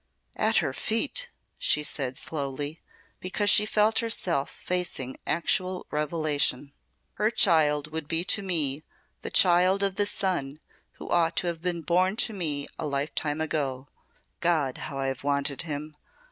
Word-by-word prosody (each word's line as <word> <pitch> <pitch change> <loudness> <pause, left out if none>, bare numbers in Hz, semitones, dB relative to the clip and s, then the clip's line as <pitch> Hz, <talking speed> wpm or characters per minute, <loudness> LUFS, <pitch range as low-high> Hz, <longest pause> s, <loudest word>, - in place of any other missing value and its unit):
"At 220 0 +2
her 135 - -2
feet!" 285 - 0 0.3
she 150 - +2
said 130 -3 -1
slowly, 145 +1 -3 0.4
because 205 +3 +1
she 210 - +5
felt 215 +1 +3
herself 180 -10 0
facing 180 -8 -3
actual 180 +3 0
revelation. 150 -3 -1 0.5
"Her 215 - +4
child 155 -8 +3
would 160 -1 -5
be 165 +2 0
to 195 +3 +2
me 155 -7 0 0.4
the - - -5
child 185 +2 +5
of 195 -1 -1
the 205 - +3
son 155 -9 -1 0.3
who - - -10
ought 170 -1 +2
to - - +1
have 170 -2 -3
been 175 -1 -2
born 185 +4 +2
to 225 -1 +2
me 150 -7 -2
a 155 - -2
life 140 +1 -2
time 150 0 -1
ago. 140 -4 -2 0.5
God, 155 -7 +1
how 140 - -6
I 135 - -2
have 135 0 -3
wanted 140 0 0
him! 150 -1 -5
160 Hz, 155 wpm, -27 LUFS, 145-185 Hz, 0.5 s, she